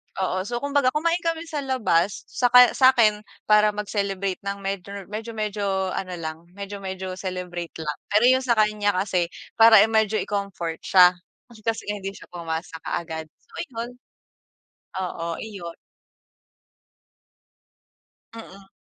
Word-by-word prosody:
Oo. 185 0 -2
So, 240 +2 -4
kumbaga 285 -2 +2
kumain 335 +3 +1
kami 330 -1 -1
sa 310 -2 -3
labas, 210 -9 +1
saka 250 -1 +6
sa 260 -1 +7
akin 215 -3 +4 0.3
para 210 0 +5
mag-celebrate 200 -2 -2
ng 200 0 -3
medyo 195 0 -4 0.2
medyo-medyo 210 -3 -2
ano 185 -1 -4
lang, 160 0 -6
medyo-medyo 190 -2 -6
celebrate 180 -2 -5
lang. 150 -2 -4
Pero 210 +2 +4
yung 260 +1 +4
sa 240 -2 +2
kanya 210 -2 +2
kasi, 185 -2 0 0.3
para 225 -1 +9
i - - +2
medyo 220 -1 +2
i-comfort 195 -5 -3
siya, 180 -2 +6 0.4
eh 215 - -17
kasi 225 -2 -2
nga 205 0 -3
hindi 195 0 -5
siya - - -13
pumasa 165 -1 -5
kaagad. 160 -2 -4 0.2
So, - - -30
ayun. 235 -3 -5 1.1
Oo, 180 -3 -4 0.2
iyon. 195 -6 -8 2.6
Mm. 195 -4 -12
200 Hz, 135 wpm, -24 LUFS, 185-225 Hz, 2.6 s, para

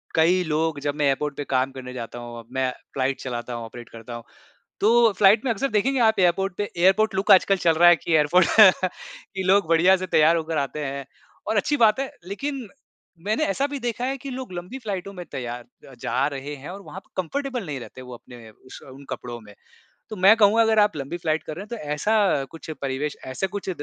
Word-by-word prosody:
कई 175 +3 +3
लोग 155 -1 -1
जब 145 0 -1
मैं 150 - 0
एयरपोर्ट 140 +1 0
पे 145 - -3
काम 130 0 0
करने 130 -1 -9
जाता 120 -1 -7
हूँ, 120 -1 -9
मैं 130 -1 0 0.2
फ्लाइट 135 0 -1
चलाता 120 -1 -5
हूँ, 120 - -5
ऑपरेट 120 +1 -11
करता 115 +1 -10
हूँ। 120 - -8 0.6
तो 230 +1 +5
फ्लाइट 210 +3 +5
में 260 - 0
अक्सर 270 +6 -2
देखेंगे 255 +6 +1
आप 220 -3 +3
एयरपोर्ट 180 +1 +2
पे, 205 0 -3
एयरपोर्ट 195 +4 +3
लुक 190 +1 -1
आजकल 195 +1 +5
चल 165 - +5
रहा 175 +2 +6
है 175 - +7
कि 170 - -4
एयरपोर्ट 160 +4 +4 0.9
कि 190 - -2
लोग 190 0 +3
बढ़िया 175 +3 +5
से 185 0 -5
तैयार 160 0 +4
होकर 160 -1 -2
आते 145 +2 -3
हैं 140 0 -5 0.4
और 220 - 0
अच्छी 290 +8 +1
बात 220 0 +4
है 270 - -3 0.2
लेकिन 265 +2 -4 0.6
मैंने 215 +1 +1
ऐसा 270 +8 0
भी 285 0 -5
देखा 240 0 -3
है 270 +1 -1
कि 275 - -8
लोग 255 -5 -7
लंबी 180 +8 -7
फ्लाइटों 200 -5 -5
में 180 -2 -8
तैयार 120 -1 -6 0.3
जा 130 +3 0
रहे 140 +1 -6
हैं 140 +4 -10
और 200 +2 -9
वहाँ 190 - -9
पर - - -34
कंफर्टेबल 255 - -4
नहीं 145 -3 -4
रहते 130 +1 -11
वो 125 -1 -10
अपने 120 -1 -13
उस 130 +4 -14
उन 140 +2 -13
कपड़ों 120 -1 -6
में। 105 -1 -15 0.6
तो 215 - -6
मैं 195 +4 +6
कहूँगा 215 +1 +5
अगर 220 -1 +3
आप 205 -4 +3
लंबी 140 +4 -5
फ्लाइट 160 -2 -1
कर 155 - -7
रहे 190 - -6
हैं 210 - -15
तो 235 - -4 0.2
ऐसा 200 -3 +2
कुछ 165 0 -11
परिवेश, 140 +2 -3
ऐसा 130 +9 -3
कुछ 195 0 -6
175 Hz, 220 wpm, -24 LUFS, 135-210 Hz, 0.9 s, है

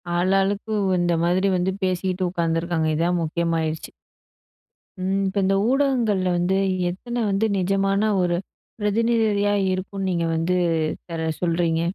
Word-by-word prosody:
ஆளாளுக்கு 195 +4 +1
உ - - 0
இந்த 175 0 +1
மாதிரி 180 +3 +2
வந்து 180 +1 0
பேசிட்டு 185 0 -1
உட்காந்துருக்காங்க. 165 -1 -1
இதான் 175 +2 +1
முக்கியமாயிருச்சு. 160 -1 -2 1.1
ம். 195 +1 0
இப்ப 190 +2 -4
இந்த 195 +1 +2
ஊடகங்கள்ல 245 -9 +1
வந்து, 180 +2 +1 0.3
எத்தனை 240 +7 -5
வந்து 200 +2 +1
நிஜமான 195 +2 +1 0.2
ஒரு 175 -1 +1 0.4
பிரதிநிதியா 210 -1 +2 0.2
இருக்கும்ன்னு 190 +1 -3
நீங்க 170 -1 0
வந்து 165 +3 0 0.5
பிறகு 160 -2 -2
சொல்றீங்க? 165 -1 +1
185 Hz, 120 wpm, -23 LUFS, 170-195 Hz, 1.1 s, மாதிரி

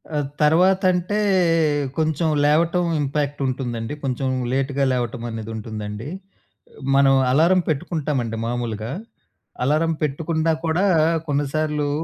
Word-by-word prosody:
ఆహ్, 145 -2 -1
తర్వాతంటే, 185 +4 +3 0.8
కొంచెం 160 +1 +1 0.2
లేవటం 170 +4 +2 0.2
ఇంపాక్ట్ 145 0 -2
ఉంటుందండి 120 -1 -3
కొంచెం 130 0 -1 0.2
లేట్‌గా 135 +1 0
లేవటం 120 -1 -3
అనేది 115 0 -6
ఉంటుందండి. 105 +1 -6 0.9
మనం 135 -1 +5 0.2
అలారం 170 +6 +4
పెట్టుకుంటామండి 135 -6 -2
మామూలుగా 115 -1 -3 0.7
అలారం 160 +3 +2
పెట్టుకున్నా 160 +2 0
కూడా 170 +5 +1 0.4
కొన్నిసార్లు, 145 +1 -1
145 Hz, 95 wpm, -22 LUFS, 125-160 Hz, 0.9 s, మనం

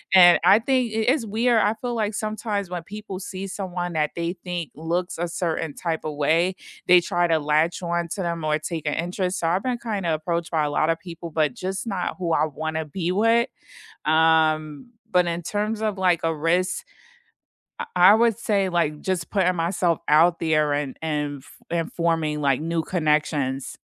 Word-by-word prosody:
And 175 -2 +8
I 205 - +7
think 250 -1 +1
it 220 +1 -1
it's 275 -6 -2
weird 225 +2 +2
I 210 0 +2
feel 245 -1 -2
like 215 -2 -1
sometimes 215 -2 -3
when 175 -2 -5
people 200 0 -7
see 190 0 -6
someone 180 -2 -4
that 150 -1 0
they 170 0 -2
think 175 -3 -4
looks 170 +4 -2
a 175 +1 -1
certain 165 -3 -2
type 165 0 -3
of 155 -1 -3
way, 165 +5 +2 0.3
they 180 0 +7
try 175 -1 0
to 165 -1 +2
latch 155 +4 +1
on 170 0 -1
to 195 - -4
them 170 -2 -3
or 155 0 +1
take 160 0 -5
a 150 - 0
interest. 180 +2 -2
So 165 - -1
I've 180 +4 +1
been 250 -1 -1
kinda 200 -8 -2
approached 170 +2 -2
by 160 -2 +1
a 150 - 0
lotta 155 +3 +1
people, 170 -1 -9
but 155 -3 +1
just 190 +4 -4
not 185 -6 -2
who 170 -2 -1
I 160 - +3
wanna 160 +1 -4
be 170 +3 -3
with. 230 +4 +3 0.6
Um, 155 - +2 0.2
but 180 -1 +3
in 170 0 -2
terms 210 +4 -2
of, 215 -2 -1
like, 180 -3 +2
a 165 0 +1
risk, 175 +4 0 0.9
I - - -3
I 180 +3 +8
would 230 -1 +3
say 200 -4 +1
like 160 -4 0
just 185 -3 -2
putting 185 -3 +2
myself 170 0 0
out 165 +3 +5
there 155 -2 +1
and 145 -2 -3
and, 150 -2 -2
f - - -17
and 165 -1 -2
forming, 165 -3 0
like, 140 -2 +2
new 165 +1 -1
connections. 150 -5 -1
170 Hz, 195 wpm, -24 LUFS, 160-190 Hz, 0.9 s, And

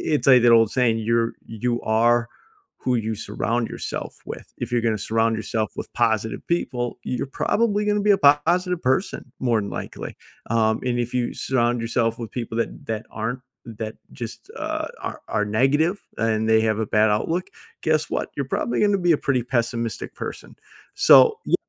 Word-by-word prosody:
it's 145 - -1
like 130 -2 +8
that 120 0 +6
old 115 -2 +6
saying, 120 -3 +2
"You're 115 +1 +1
you 120 +2 -2
are 115 +2 +3 0.5
who 125 - +1
you 110 -1 -1
surround 115 +3 -2
yourself - - -5
with." - - -9
If 120 - -4
you're 120 -1 +2
gonna 110 -1 +1
surround 115 0 +2
yourself 110 0 -2
with - - -5
positive 110 -2 0
people, 125 -8 -2
you're 125 +2 -2
probably 210 -2 +2
gonna 210 0 +1
be 205 0 +4
a 195 - +5 0.3
positive 180 +1 +1
person 130 - -1
more 120 -4 +2
than 100 - -5
likely. - - -6 0.3
Um, 110 -1 +2
and 120 -1 0
if 120 +1 -2
you 125 -1 0
surround 120 -2 0
yourself 115 0 0
with 115 -2 -6
people 115 -2 -4
that - - -3
that 110 -1 -3
aren't, 115 +4 -3 0.4
that 110 0 -4 0.2
just, 115 -3 -8
uh, - - -3
are - - -5
are 105 - 0
negative 140 - +2 0.2
and 110 -1 +1
they 110 0 +5
have 110 -1 +1
a 110 - 0
bad 105 +1 +3
outlook, 165 - 0 0.4
guess 155 -1 +1
what? - - -2
You're 140 - -1
probably 120 0 -1
gonna 205 -2 +3
be 175 -1 +3
a - - +2
pretty 130 -3 +3
pessimistic 120 -2 -2
person. - - -7 0.4
So 450 -1 +7
y - - +4
120 Hz, 185 wpm, -23 LUFS, 110-135 Hz, 0.5 s, like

